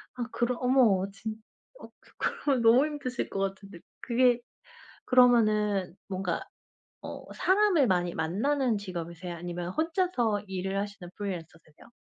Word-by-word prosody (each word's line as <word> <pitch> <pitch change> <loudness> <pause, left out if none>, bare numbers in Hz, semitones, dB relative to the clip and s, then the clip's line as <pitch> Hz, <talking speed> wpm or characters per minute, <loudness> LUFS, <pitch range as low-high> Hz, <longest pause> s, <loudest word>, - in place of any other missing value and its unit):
아 245 - -3
그럼 240 +1 0
어머 240 -7 +4
진 215 +2 -6 0.5
어 - - -10
그 - - -23
그러면 270 -5 0
너무 235 +5 +6
힘드실 280 -5 -4
것 195 - -4
같은데 195 -2 -4 0.2
그게 245 0 +3 0.7
그러면은 215 -7 +4
뭔가 185 -3 -2 0.6
어 - - -7
사람을 375 - +3
많이 175 -2 +1
만나는 230 - 0
직업이세요, 175 -2 -6
아니면 175 +1 -5
혼자서 315 - 0
일을 190 +1 -2
하시는 200 -3 -6
프리랜서세요? 165 -6 -8
205 Hz, 295 characters per minute, -28 LUFS, 185-250 Hz, 0.7 s, 너무